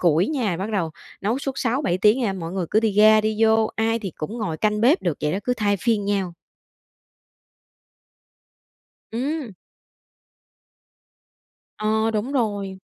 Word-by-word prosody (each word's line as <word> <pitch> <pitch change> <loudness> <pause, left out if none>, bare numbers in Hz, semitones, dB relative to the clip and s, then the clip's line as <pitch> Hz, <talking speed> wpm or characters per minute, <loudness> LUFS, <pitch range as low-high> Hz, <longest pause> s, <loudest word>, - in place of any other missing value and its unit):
củi 170 +2 +3
nha, 235 - -1
bắt 195 +5 -4
đầu 170 -6 0 0.3
nấu 225 +7 0
suốt 275 -1 -3
6-7 245 -6 0
tiếng 215 +6 +4
nha, 210 -5 0
mọi 170 -2 -6
người 185 -3 -2
cứ 215 - +3
đi 220 -2 +1
ra 215 +1 +6
đi 215 0 -1
vô, 220 0 +4
ai 225 +1 +1
thì 195 -7 -6
cũng 215 +10 -5
ngồi 175 -8 -2
canh 210 +2 0
bếp 275 +10 +4
được, 170 -5 -1
vậy 150 0 0
đó, 195 - -1
cứ 250 - +1
thay 205 -3 +1
phiên 220 -1 0
nhau. 195 -4 -1 2.8
Ừm. 265 -1 -3 2.2
Ờ, 220 +1 +1
đúng 220 +6 -2
rồi. 205 -6 -1
215 Hz, 155 wpm, -23 LUFS, 195-230 Hz, 2.8 s, ra